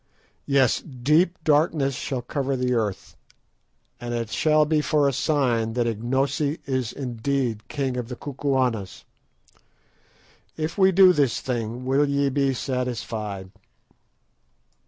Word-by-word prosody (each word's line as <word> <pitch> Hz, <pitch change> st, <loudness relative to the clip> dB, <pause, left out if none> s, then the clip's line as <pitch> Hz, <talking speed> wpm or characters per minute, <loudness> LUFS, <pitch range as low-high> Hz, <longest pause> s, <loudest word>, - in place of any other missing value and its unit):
Yes, 135 Hz, -4 st, +3 dB
deep 150 Hz, +6 st, +1 dB
darkness 150 Hz, -2 st, +2 dB
shall 130 Hz, -1 st, -4 dB
cover 135 Hz, +1 st, -2 dB
the 125 Hz, -1 st, 0 dB
earth, 105 Hz, -5 st, -2 dB, 0.8 s
and 120 Hz, 0 st, -4 dB
it 115 Hz, -1 st, -3 dB
shall 155 Hz, -1 st, +3 dB
be 155 Hz, 0 st, +1 dB
for 150 Hz, -1 st, +2 dB
a 140 Hz, -, +1 dB
sign 120 Hz, -6 st, +1 dB
that 120 Hz, 0 st, 0 dB
Ignosi 135 Hz, +7 st, -1 dB
is 130 Hz, -4 st, -1 dB
indeed 120 Hz, -3 st, -2 dB
king 135 Hz, -2 st, -2 dB
of 120 Hz, -2 st, -3 dB
the 125 Hz, -, -6 dB
Kukuanas. 130 Hz, -7 st, -2 dB, 1.5 s
If 155 Hz, +1 st, -3 dB
we 190 Hz, -1 st, +4 dB
do 185 Hz, 0 st, +7 dB
this 140 Hz, -8 st, +1 dB
thing, 120 Hz, 0 st, -4 dB
will 140 Hz, +2 st, +2 dB
ye 140 Hz, 0 st, +1 dB
be 140 Hz, 0 st, +1 dB
satisfied?" 115 Hz, -7 st, -4 dB
130 Hz, 125 wpm, -24 LUFS, 120-145 Hz, 1.5 s, do